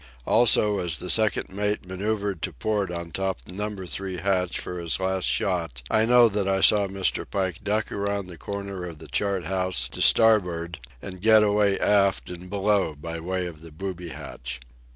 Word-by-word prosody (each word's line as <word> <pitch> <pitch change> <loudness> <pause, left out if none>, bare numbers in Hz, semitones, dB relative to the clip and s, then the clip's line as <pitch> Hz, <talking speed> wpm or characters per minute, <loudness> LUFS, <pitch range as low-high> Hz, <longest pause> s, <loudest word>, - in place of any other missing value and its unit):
Also, 105 -3 +5
as 85 -2 -1
the 90 - -2
second 110 -5 +2
mate 105 -1 -1
manoeuvred 100 0 -3
to - - -2
port 105 -3 -2
on 85 -1 -6
top 95 +1 -2
of - - -11
Number 105 -1 -5
Three 95 +2 -2
hatch 90 0 0
for 90 - -6
his 85 -1 -1
last 95 0 -1
shot, 85 -10 -1
I 110 0 +3
know 120 0 +6
that 100 -2 -1
I 95 0 +1
saw 100 0 +5
Mr. 95 -1 -1
Pike 95 -1 -2
duck 105 +1 -1
around 100 -1 -2
the 90 -1 -10
corner 100 +2 -6
of 85 -3 -7
the 80 +1 -12
chart 95 +4 -1
house 95 0 0
to - - -6
starboard 90 -7 +4 0.2
and 95 -2 -8
get 110 0 +6
away 105 -1 +2
aft 100 -3 +2
and 90 +1 -9
below 100 -4 0
by 85 +3 -6
way 90 +2 -3
of 80 -3 -8
the 85 - -11
booby 90 +1 -6
hatch. 60 -5 -6
95 Hz, 190 wpm, -25 LUFS, 90-100 Hz, 0.2 s, know